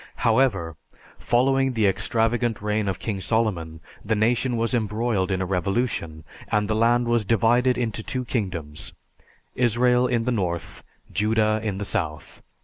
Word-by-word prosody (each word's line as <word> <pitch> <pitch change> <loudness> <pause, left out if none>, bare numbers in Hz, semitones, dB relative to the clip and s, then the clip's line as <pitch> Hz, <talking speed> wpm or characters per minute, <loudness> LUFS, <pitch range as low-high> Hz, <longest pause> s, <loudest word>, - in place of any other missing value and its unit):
However, 110 - +2 0.4
following 135 +2 +2
the 110 -3 +1
extravagant 115 +3 +1
reign 105 0 -1
of 95 -1 -1
King 100 -4 -4
Solomon, 90 -8 -1 0.2
the 110 +1 0
nation 120 +3 +1
was 115 +2 0
embroiled 110 -3 0
in 95 -1 0
a - - -2
revolution, 90 -4 -2 0.3
and 105 0 +1
the 110 - 0
land 120 +2 +3
was 120 -1 +2
divided 115 +4 +2
into 110 -3 -2
two 125 +3 -4
kingdoms 90 - -4 0.6
Israel 125 +1 +3
in 115 -2 0
the 125 - +1
north, 90 -7 -3 0.3
Judah 110 0 +2
in 105 -3 -2
the 105 - -4
south. 75 -5 -4
110 Hz, 145 wpm, -24 LUFS, 95-120 Hz, 0.6 s, land